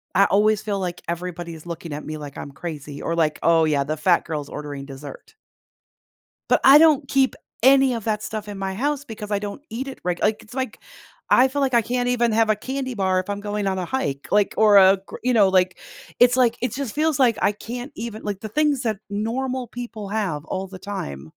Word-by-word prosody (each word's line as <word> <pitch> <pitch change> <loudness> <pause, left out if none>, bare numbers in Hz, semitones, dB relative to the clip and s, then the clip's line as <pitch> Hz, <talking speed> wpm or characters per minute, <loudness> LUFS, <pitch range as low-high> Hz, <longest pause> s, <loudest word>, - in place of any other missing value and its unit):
I 195 - +6
always 210 +1 +3
feel 205 -2 -2
like 180 -2 -4
everybody's 170 -2 -5
looking 170 -1 -7
at 150 +1 -6
me, 155 - -5
like, 145 -2 -9
I'm 140 - -7
crazy 145 -3 -7
or 165 - -2
like, 155 -2 +1
"Oh, 165 -1 +4
yeah. 145 -2 +1
The 155 +2 -3
fat 170 +3 +3
girl's 150 -3 -4
ordering 145 -2 -7
dessert." 145 - -11 1.2
But - - +4
I 275 +2 +9
don't 305 -3 +5
keep 265 0 +2 0.3
any 270 0 +6
of 230 -3 -4
that 215 -1 -1
stuff 215 -1 -5
in 205 -1 -6
my 190 0 -3
house 290 +5 -1
because 215 -3 -8
I 200 - +1
don't 205 +6 -6
eat 245 +5 -4
it, 270 - -8
right, 175 -1 -2
like, 215 0 +1
it's 220 - -15
like, 260 -1 -4 0.5
I 255 - +5
feel 280 +2 -2
like 265 -2 0
I 235 - +5
can't 245 +2 -1
even 240 -2 +2
have 225 -1 +3
a 215 - +2
candy 260 +3 -4
bar 190 -3 +1
if 185 +2 -5
I'm 200 - -3
going 205 0 -3
on 190 -1 0
a 180 - -2
hike, 155 - -3
like, 205 -1 +3
or 210 -2 +6
a 190 0 +7
gr - - -9
you 250 0 +2
know, 200 -4 +5
like, 185 -1 +2 0.4
it's 245 +1 +5
like 240 -2 +3
it 250 -3 -1
just 265 -4 -4
feels 310 -1 +1
like 240 -5 +4
I - - +3
can't 245 +6 -7
even 225 -1 -6
like, 205 -1 -4
the 220 - -5
things 295 +1 +1
that 220 -3 -1
normal 245 +4 -2
people 230 -4 -7
have 185 -8 -2
all 190 +3 -4
the 185 0 -10
time. 80 - -6
210 Hz, 230 wpm, -23 LUFS, 175-245 Hz, 1.2 s, I